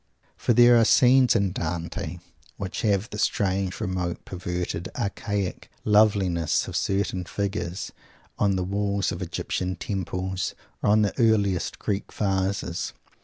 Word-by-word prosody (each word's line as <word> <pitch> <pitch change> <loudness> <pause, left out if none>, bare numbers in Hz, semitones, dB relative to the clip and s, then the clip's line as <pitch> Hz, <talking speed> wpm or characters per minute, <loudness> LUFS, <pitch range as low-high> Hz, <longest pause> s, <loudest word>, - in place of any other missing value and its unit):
For 120 - +1
there 120 +1 +7
are 115 - +6
scenes 125 +2 +5
in 100 -4 +2
Dante 85 -1 -4 0.4
which 95 -2 -4
have 105 0 +1
the 105 - -5
strange, 95 -3 0
remote, 90 -2 -3
perverted, 90 -1 -4
archaic 100 -3 -3 0.2
loveliness 100 -6 +3
of - - -6
certain 95 -2 0
figures 95 -1 -3 0.5
on 100 -2 +3
the 95 - 0
walls 100 +1 0
of - - -5
Egyptian 90 0 -2
temples 95 0 -3 0.3
or - - +2
on 105 +1 +5
the 105 - 0
earliest 105 -6 +2
Greek 100 0 -3
vases. 95 -1 -1
100 Hz, 130 wpm, -25 LUFS, 90-105 Hz, 0.5 s, there